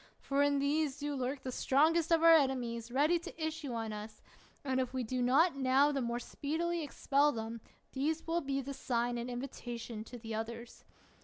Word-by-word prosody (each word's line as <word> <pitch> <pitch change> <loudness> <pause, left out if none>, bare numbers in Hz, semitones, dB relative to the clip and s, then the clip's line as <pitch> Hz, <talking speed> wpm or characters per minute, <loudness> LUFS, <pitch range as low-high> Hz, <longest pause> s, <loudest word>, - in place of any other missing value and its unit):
For 280 0 0
in 285 0 +3
these 285 0 +1
do 290 0 -3
lurk 265 0 -3
the 255 - -4
strongest 315 +6 +2
of 330 -1 +4
our 330 0 +9
enemies 245 -6 +1
ready 300 +7 +3
to 335 - -10
issue 315 -5 -4
on 225 -2 -3
us; 210 +1 -8 0.4
and 260 -1 +1
if 255 0 -2
we 255 - 0
do 250 +2 -2
not 275 +7 +4
now 270 +2 +3
the 275 -2 -1
more 235 0 -1
speedily 330 +7 -2
expel 290 0 +2
them, 225 -2 -5 0.3
these 305 +4 -1
will 335 +1 0
be 275 -1 -1
the 275 +1 -6
sign 240 -2 -1
and 235 +1 -4
invitation 240 -3 -6
to 245 - -9
the 225 -1 -7
others. 230 +2 -6
265 Hz, 190 wpm, -33 LUFS, 240-295 Hz, 0.4 s, our